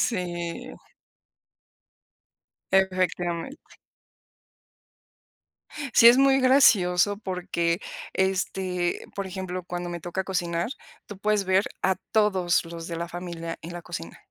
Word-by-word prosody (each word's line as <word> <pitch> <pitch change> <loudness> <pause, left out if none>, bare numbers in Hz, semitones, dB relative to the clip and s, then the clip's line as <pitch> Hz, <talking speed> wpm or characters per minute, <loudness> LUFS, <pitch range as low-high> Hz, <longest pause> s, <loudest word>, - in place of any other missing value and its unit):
Sí. 175 -5 -3 2.0
Efectivamente. 185 - 0 2.2
Sí 230 - +8
es 240 +2 +8
muy 270 0 +5
gracioso 205 -7 +4
porque, 180 -3 -1 0.3
este, 185 -1 -1
por 200 -1 -4
ejemplo, 185 -1 -5
cuando 175 0 -5
me 175 0 -5
toca 175 +3 -3
cocinar 175 0 -1 0.4
tú 205 - -9
puedes 210 0 +1
ver 190 +1 +2 0.2
a 190 0 +2 0.2
todos 190 -5 +2
los 165 0 -7
de 170 - -4
la 170 +1 -4
familia 170 -2 -6
en 170 +2 -8
la 175 - -6
cocina, 160 - -7
180 Hz, 110 wpm, -26 LUFS, 175-195 Hz, 2.2 s, Sí